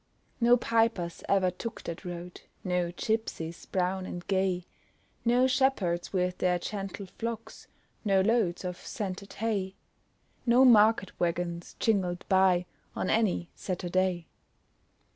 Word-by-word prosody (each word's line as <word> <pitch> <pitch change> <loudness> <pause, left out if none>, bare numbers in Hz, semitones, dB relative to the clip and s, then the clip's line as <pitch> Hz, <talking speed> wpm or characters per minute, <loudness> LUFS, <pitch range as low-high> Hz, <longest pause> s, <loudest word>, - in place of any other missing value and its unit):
No 240 +1 +6
pipers 225 -8 0
ever 190 -2 +3
took 230 +6 -7
that 170 0 -6
road, 175 0 -7 0.2
No 180 -1 0
gipsies, 175 -5 -3
brown 185 0 -1
and 175 0 -6
gay; 190 -2 0 0.6
No 245 +2 +4
shepherds 255 -10 +1
with 180 -1 0
their 180 -1 +2
gentle 195 +1 -5
flocks, 230 -1 -5 0.4
No 195 -3 +3
loads 200 -4 +1
of 180 -1 -3
scented 200 -2 -5
hay; 200 -3 -2 0.7
No 245 +2 +5
market 220 -4 +5
waggons 170 0 -2
jingled 185 -5 +1
by 190 -2 +4 0.3
On - - -1
any 205 -6 +1
Saturday. 185 -1 -1
190 Hz, 120 wpm, -29 LUFS, 180-225 Hz, 0.7 s, No